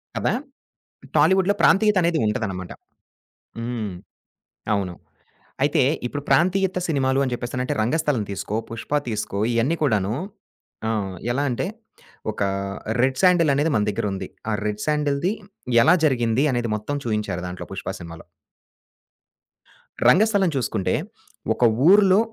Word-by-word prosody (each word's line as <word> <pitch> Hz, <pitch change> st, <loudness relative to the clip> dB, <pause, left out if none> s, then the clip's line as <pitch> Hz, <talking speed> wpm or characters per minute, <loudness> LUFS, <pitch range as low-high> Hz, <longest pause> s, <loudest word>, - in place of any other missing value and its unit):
కదా! -, -, 0 dB, 0.8 s
టాలీవుడ్‌లో 190 Hz, +1 st, +4 dB
ప్రాంతీయతనేదుంటదనమాట. 145 Hz, -, +2 dB, 0.9 s
హ్మ్. 115 Hz, -4 st, -3 dB, 0.8 s
అవును. 95 Hz, -3 st, -1 dB, 0.7 s
అయితే 145 Hz, 0 st, +3 dB, 0.2 s
ఇప్పుడు 145 Hz, +3 st, -4 dB
ప్రాంతీయత 185 Hz, +1 st, +2 dB
సినిమాలు 135 Hz, -3 st, +1 dB
అని 130 Hz, -, -3 dB
చెప్పేసనంటే 125 Hz, +1 st, -3 dB
'రంగస్థలం' 130 Hz, -2 st, 0 dB
తీసుకో, 100 Hz, +2 st, -3 dB
'పుష్ప; 115 Hz, +4 st, -8 dB, 0.2 s
తీసుకో 105 Hz, -2 st, -3 dB
ఇయన్నీ 125 Hz, +8 st, +1 dB
కూడాను 105 Hz, -5 st, +1 dB, 0.7 s
ఆహ్, 100 Hz, -4 st, -1 dB, 0.2 s
ఎలా 140 Hz, +3 st, 0 dB
అంటే 125 Hz, +8 st, -2 dB, 0.6 s
ఒకా 100 Hz, -2 st, -1 dB, 0.5 s
రెడ్ 130 Hz, +1 st, +2 dB
శాండెలనేది 165 Hz, -5 st, +4 dB
మన 105 Hz, -, +2 dB
దగ్గరుంది. 100 Hz, -2 st, -2 dB, 0.2 s
ఆ -, -, 0 dB
రెడ్ 105 Hz, 0 st, -2 dB
శాండెల్‌ది 150 Hz, +4 st, +1 dB, 0.5 s
ఎలా 160 Hz, +7 st, +6 dB
జరిగింది? 120 Hz, -3 st, +2 dB
అనేది 120 Hz, -2 st, -1 dB
మొత్తం 125 Hz, +8 st, -4 dB
చూయించారు 105 Hz, -5 st, -2 dB
దాంట్లో 90 Hz, 0 st, -7 dB
'పుష్ప' 95 Hz, 0 st, -5 dB
సినిమాలో. 85 Hz, -1 st, -10 dB, 1.8 s
'రంగస్థలం' 200 Hz, -3 st, +4 dB
చూసుకుంటే 110 Hz, -7 st, -1 dB, 0.6 s
ఒక -, -, -2 dB, 0.2 s
ఊరిలో, 195 Hz, 0 st, +6 dB
125 Hz, 105 wpm, -23 LUFS, 105-160 Hz, 1.8 s, ఎలా